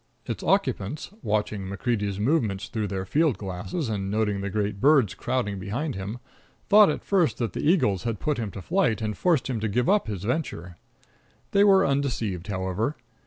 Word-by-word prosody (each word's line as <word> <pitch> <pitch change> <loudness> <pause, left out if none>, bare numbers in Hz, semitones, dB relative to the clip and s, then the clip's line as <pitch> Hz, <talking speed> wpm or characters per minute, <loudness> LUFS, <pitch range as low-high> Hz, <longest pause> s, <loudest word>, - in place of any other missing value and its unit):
Its - - -4
occupants, 105 - 0
watching 105 -1 -1
MacCreedy's 100 -1 -2
movements 110 -6 0
through 110 -3 -2
their 95 -1 -3
field 150 - +2
glasses, 100 - -4
and 100 -3 -2
noting 105 -1 0
the 100 - -3
great 105 0 -2
birds 135 -6 +4
crowding 105 -7 -2
behind 120 - -3
him, 100 +4 -5 0.5
thought 210 0 +8
at - - -2
first 170 - +2
that 115 -7 -2
the - - -3
eagles 105 - +2
had 110 0 -3
put 150 -4 -1
him 110 -3 -2
to 95 -1 -8
flight 170 - +1
and 110 -2 -2
forced 165 - +1
him 125 -4 -2
to 110 - -1
give 120 +4 0
up 205 - +3
his 100 -4 -4
venture. 105 - -3 0.8
They 200 - +5
were 195 -2 +6
undeceived, 115 -10 -1
however. 100 +7 -2
110 Hz, 180 wpm, -26 LUFS, 100-140 Hz, 0.8 s, thought